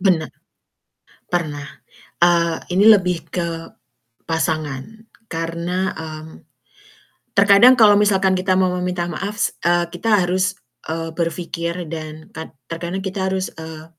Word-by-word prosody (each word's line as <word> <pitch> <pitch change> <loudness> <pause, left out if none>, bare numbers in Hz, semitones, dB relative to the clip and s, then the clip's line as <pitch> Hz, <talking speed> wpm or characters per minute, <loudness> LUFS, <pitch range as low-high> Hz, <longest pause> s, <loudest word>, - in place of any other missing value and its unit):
Bena 180 -5 +2 1.0
pernah. 150 -5 -2 0.6
Eee, 170 -1 +3 0.2
ini 200 - +5
lebih 185 -6 +5
ke 170 -2 -2 0.7
pasangan 155 -4 -1 0.5
karena, 170 +3 -2
mmm, 160 0 -9 1.0
terkadang 200 +5 +7
kalau 215 -4 +7
misalkan 195 -2 +3
kita 185 0 +1
mau 185 -1 +3
meminta 180 -1 -2
maaf 200 +6 -4
s - - 0
eee, 175 0 +2
kita 210 +2 +2
harus, 185 +1 0 0.3
eee, 165 +1 -3
berfikir 170 +1 -3
dan 155 -1 -7
kad 160 0 -9 0.2
terkadang 175 +3 -4
kita 190 0 -2
harus, 190 0 -2
eee, 160 -1 -8
175 Hz, 120 wpm, -20 LUFS, 165-190 Hz, 1.0 s, terkadang